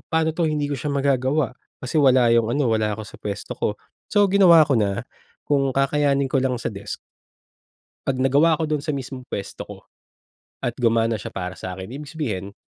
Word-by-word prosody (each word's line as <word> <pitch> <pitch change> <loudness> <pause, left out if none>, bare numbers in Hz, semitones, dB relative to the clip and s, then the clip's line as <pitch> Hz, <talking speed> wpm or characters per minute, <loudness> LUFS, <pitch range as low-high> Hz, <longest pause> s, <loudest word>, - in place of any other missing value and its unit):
paano 160 -1 +1
'to, 170 +1 -1
hindi 150 -1 -1
ko 145 - -2
siya 150 - -4
magagawa, 135 0 +1 0.3
kasi 130 +5 -4
wala 130 -3 +5
yung 115 -1 +3
ano, 140 -3 +1
wala 110 -1 +1
ako 110 - -6
sa - - -12
puwesto 100 -2 -5
ko." - - 0 0.4
So, 205 -1 +4
ginawa 170 -5 +7
ko 135 - +3
na, 100 -1 -1 0.4
kung 135 -2 +2
kakayanin 140 0 +2
ko 135 0 +1
lang 125 -3 -1
sa - - -2
desk, 100 -2 -7 1.1
'pag 135 - +1
nagawa 150 +5 +4
ko 160 - -3
dun 150 - +1
sa 150 0 -3
mismong 130 -1 -7
puwesto 100 -1 -6
ko - - -11 0.8
at 120 - 0
gumana 115 -1 +2
siya - - -7
para 90 -1 -4
sa 90 - -5
akin, 95 +4 -8
ibig 145 +2 -7
sabihin, 105 - -4
135 Hz, 195 wpm, -23 LUFS, 115-150 Hz, 1.1 s, ginawa